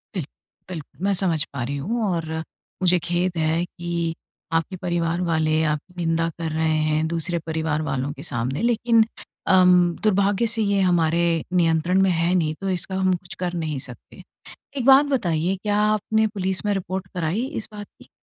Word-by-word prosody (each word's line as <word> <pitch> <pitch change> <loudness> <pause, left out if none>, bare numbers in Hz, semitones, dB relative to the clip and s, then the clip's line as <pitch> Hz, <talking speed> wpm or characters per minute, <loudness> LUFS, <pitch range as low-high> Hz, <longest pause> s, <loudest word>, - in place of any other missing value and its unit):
बिल्क 175 -7 -2 0.4
बिल्क 165 -5 -6 0.2
मैं 200 0 +2
समझ 175 -5 +1
पा 135 -3 -3
रही 140 +4 -3
हूँ 225 +12 -2
और 165 -2 -3 0.5
मुझे 180 -1 +4
खेद 175 0 -1
है 160 +1 +1
कि 170 -1 -3 0.4
आपके 165 +3 0
परिवार 175 -1 -1
वाले 160 -2 +1
आपकी 155 +5 -7
निंदा 165 0 +1
कर 165 -1 -2
रहे 160 +1 0 0.2
हैं 155 +1 +1
दूसरे 170 +1 -1
परिवार 160 -1 -1
वालों 135 -2 -2
के - - -10
सामने 125 +6 -2
लेकिन 230 -1 +3 0.4
अम, 180 -2 +5
दुर्भाग्य 205 +2 +2
से 225 - +1
ये 200 -1 +2
हमारे 170 -2 +2 0.3
नियंत्रण 170 +1 +3
में 190 - +4
है 170 +1 +1
नहीं, 160 -4 +1
तो 195 - -2
इसका 190 +1 -2
हम 190 0 +2
कुछ 175 0 -10
कर 180 -1 -2
नहीं 160 -4 -2
सकते। 125 -2 -9 0.6
एक 255 - -1
बात 270 +2 +7
बताइए 185 - 0
क्या 205 -1 +1
आपने 215 +1 +2
पुलिस 190 -2 -3
में 205 - +2
रिपोर्ट 190 -1 -3
कराई 180 +6 -1
इस 220 - -4
बात 205 -1 -7 0.2
की? - - -15
175 Hz, 180 wpm, -23 LUFS, 160-195 Hz, 0.6 s, बात